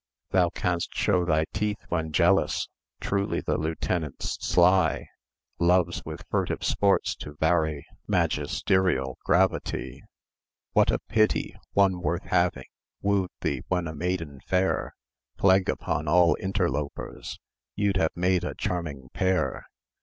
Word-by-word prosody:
Thou 90 -2 +4
canst 90 0 -2
show 90 -4 +2
thy 80 -2 +2
teeth 105 0 -1
when 80 -2 -1
jealous; 85 -1 +2 0.3
Truly 100 0 -1
the - - -1
lieutenant's 80 -1 -2
sly; 90 -2 +3 0.5
Loves 90 0 +2
with - - -7
furtive - - -1
sports 100 -1 +2
to 75 - -9
vary 80 -2 +1 0.2
Magisterial 90 -9 +1
gravity. - - 0 0.7
What - - +4
a - - +2
pity! 110 -1 0 0.2
One 95 -3 +3
worth 85 +1 -1
having 85 -7 +1 0.4
Woo'd 100 -2 +1
thee 70 -3 -1
when 90 -2 0
a 80 - -5
maiden 80 -3 -3
fair. 95 0 0 0.4
Plague 95 -1 +4
upon 75 - -2
all 85 +2 +5
interlopers! 85 -7 -3 0.4
You'd 100 -2 +1
have 80 -4 +1
made 90 0 +2
a 90 - -4
charming 75 -8 -4
pair. 95 -8 0
90 Hz, 125 wpm, -26 LUFS, 80-95 Hz, 0.7 s, all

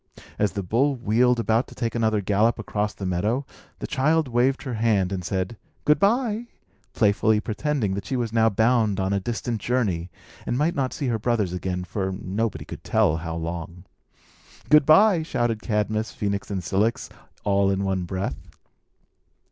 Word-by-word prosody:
As 105 -1 +1
the 100 - -3
bull 130 +10 +1
wheeled 120 +1 +2
about 115 +1 +1
to - - -14
take 115 -2 -2
another 110 -3 +1
gallop 105 +4 +2
across 105 -1 -2
the 100 - -6
meadow, 105 +9 0 0.3
the - - -5
child 155 +3 +1
waved 125 +2 +1
her 130 - -4
hand, 110 -5 +1
and 95 -2 -3
said, 95 +4 -2 0.3
"Good 150 +1 +4
by," 230 +2 +1 0.5
playfully 105 0 +3
pretending 115 -1 -1
that 100 0 -5
she 130 - -2
was 120 -3 -2
now 115 -1 +4
bound 110 -1 +2
on 95 +1 0
a 100 - +1
distant 115 +1 -3
journey, 100 -9 -1 0.3
and 120 - -2
might 155 +5 +1
not 135 -6 -1
see 145 - -4
her 115 -2 0
brothers 110 -5 0
again 90 0 -3
for 95 +2 -3
nobody 95 -4 -3
could - - -9
tell 80 - +2
how 80 0 -5
long. 85 +1 -5 0.9
"Good 150 -1 +6
by," 180 +2 +6
shouted 120 -8 -1
Cadmus, 110 0 -1
Phœnix, 100 -1 -3
and 95 -3 -3
Cilix, 100 +7 0 0.4
all 100 -1 +2
in 100 0 0
one 95 -2 -1
breath. 95 +2 -4
110 Hz, 170 wpm, -24 LUFS, 95-125 Hz, 0.9 s, Good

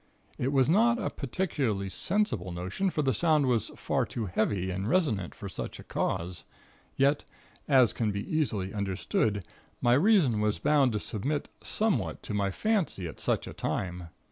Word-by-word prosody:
It 130 +2 0
was 135 -3 +3
not 230 +8 +4
a 215 - -2
particularly 130 - -2
sensible 115 - +3
notion, 95 - -2
for 155 -4 -1
the 135 -2 +2
sound 155 +2 +3
was 120 -4 +1
far - - 0
too 115 - -4
heavy 95 -1 0
and 95 +4 -3
resonant 125 - +1
for 100 - -7
such 95 - -6
a - - -9
cause. 85 0 -2 0.5
Yet, 140 +2 +3 0.4
as 130 -7 +5
can 110 -3 0
be 100 0 -4
easily 110 - -1
understood, 100 0 -1 0.3
my 120 - +3
reason 150 - +4
was 105 0 +1
bound 140 -4 +3
to 105 - 0
submit 135 +9 -3
somewhat 220 -2 -1
to 110 - -5
my 100 -1 +1
fancy 180 - -1
at 80 - -9
such - - 0
a - - -8
time. 90 -2 -3
120 Hz, 170 wpm, -29 LUFS, 100-150 Hz, 0.5 s, as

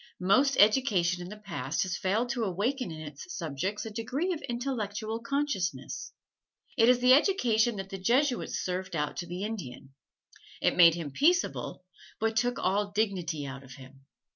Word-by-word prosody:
Most 260 +10 +3
education 205 -6 +3
in 175 - -7
the 210 - -8
past 210 -4 -3
has 185 -2 -3
failed 215 +7 0
to 240 -2 -1
awaken 225 +7 -1
in 160 -1 -7
its 150 +2 -9
subject 170 - -3
a 220 - -6
degree 255 - -2
of 320 - -6
intellectual 225 -3 -3
consciousness. 270 -6 -2 0.6
It 230 -1 +5
is 250 -1 +4
the 250 +1 +7
education 240 - +3
that 195 -1 -6
the 195 - -5
Jesuits 250 +7 +1
served 180 -1 -3
out 150 -1 -2
to 175 - -4
the 180 +3 -5
Indian. 140 - -6 0.7
It - - +2
made 170 -2 +7
him 165 -4 -5
peaceable, 320 - +1 0.3
but 225 0 0
took 245 +2 +1
all 205 +1 0
dignity 185 -8 -1
out 135 0 -7
of 130 -1 -12
him. 135 +1 -15
205 Hz, 165 wpm, -29 LUFS, 175-245 Hz, 0.7 s, the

